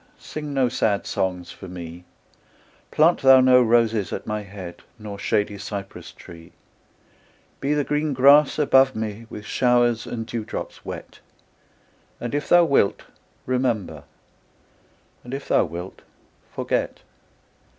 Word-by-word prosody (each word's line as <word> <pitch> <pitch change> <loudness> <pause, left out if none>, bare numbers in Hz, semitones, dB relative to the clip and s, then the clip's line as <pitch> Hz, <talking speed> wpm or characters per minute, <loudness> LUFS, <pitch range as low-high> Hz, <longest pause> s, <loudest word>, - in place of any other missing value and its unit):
Sing 150 -1 -7
no 135 -2 +2
sad 110 -4 0
songs 90 -2 -3
for - - -11
me; 90 -1 -9 0.8
Plant 165 +3 +3
thou 135 -1 +7
no 130 0 +6
roses 115 -5 +2
at - - -5
my 105 0 -3
head, 95 -3 -10 0.2
Nor 105 -2 -8
shady 105 -1 -1
cypress 100 -1 -7
tree: 85 -1 -14 1.1
Be 145 +2 0
the 145 - +1
green 150 +1 -1
grass 140 +2 +5
above 135 -3 +4
me 110 +1 -5
With 105 - -9
showers 120 -1 +2
and 115 -2 -5
dewdrops 115 -2 -6
wet; - - -9 1.0
And 120 - -5
if 145 0 -2
thou 175 -1 +6
wilt, 140 -9 +2 0.4
remember, 115 - -2 1.2
And 125 +2 -6
if 140 - -8
thou - - +3
wilt, 85 +3 -8 0.5
forget. - - -2
115 Hz, 130 wpm, -23 LUFS, 100-135 Hz, 1.2 s, thou